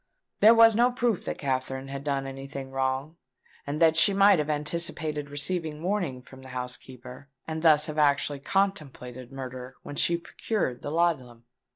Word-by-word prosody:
There 220 +2 +7
was 225 -1 +7
no 240 +2 +4
proof 240 -5 -1
that - - -3
Katherine 130 -1 -3
had 140 0 -6
done 140 -2 -1
any 135 0 -7
thing 135 -1 -7
wrong, 135 +4 -2 0.5
and 145 +2 -3
that 160 -1 +5
she 195 +5 +4
might 200 -2 +6
have 150 0 -2
anticipated 150 -1 -1
receiving 155 +1 -1
warning 175 -10 -2
from 130 0 -14
the 130 - -12
housekeeper, 125 +1 -8 0.2
and 160 0 -4
thus 155 -2 +5
have 155 -1 -4
actually 145 -1 +2
contemplated 140 -9 -2
murder 130 -1 -8
when 145 - -8
she 170 +3 +2
procured 170 - -3
the - - -5
laudanum. 140 -8 -1
145 Hz, 170 wpm, -27 LUFS, 130-170 Hz, 0.5 s, There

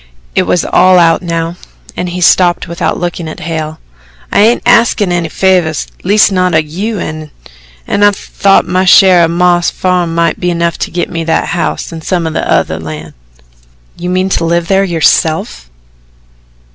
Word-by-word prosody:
It - - 0
was 180 - 0
all 185 0 +4
out 165 -2 +3
now, 170 -1 -3 0.4
and 180 - -3
he 180 +1 -5
stopped 175 0 +3
without 170 -1 -3
looking 175 -1 -4
at 155 - -9
Hale. 160 -1 -4 0.5
"I - - +2
ain't 225 +3 +2
axin' 230 -5 +3
any 175 -2 -1
favours, 180 -4 0 0.2
leastwise 205 +2 +3
not 185 -2 +1
o' - - +5
you, 180 +9 -3
an' 155 -3 -6 0.6
I 205 0 +3
thought 195 -1 0
my 185 +1 +1
share 185 -2 +5
o' - - +3
Mam's 175 +1 +1
farm 180 -3 -1
mought 170 -1 0
be 180 - -1
enough 170 -1 -2
to - - -3
git 175 0 -3
me 165 -2 -3
the 160 0 0
house 175 0 -3
an' 165 - -7
some 175 0 -2
o' 160 - -2 0.3
the 80 - -6
land." 80 -1 -8 0.8
"You 175 +1 -5
mean 185 +1 0
to 180 - -1
live 170 0 -1
there, 195 0 +3
yourself?" 160 - 0
175 Hz, 170 wpm, -11 LUFS, 165-185 Hz, 0.8 s, o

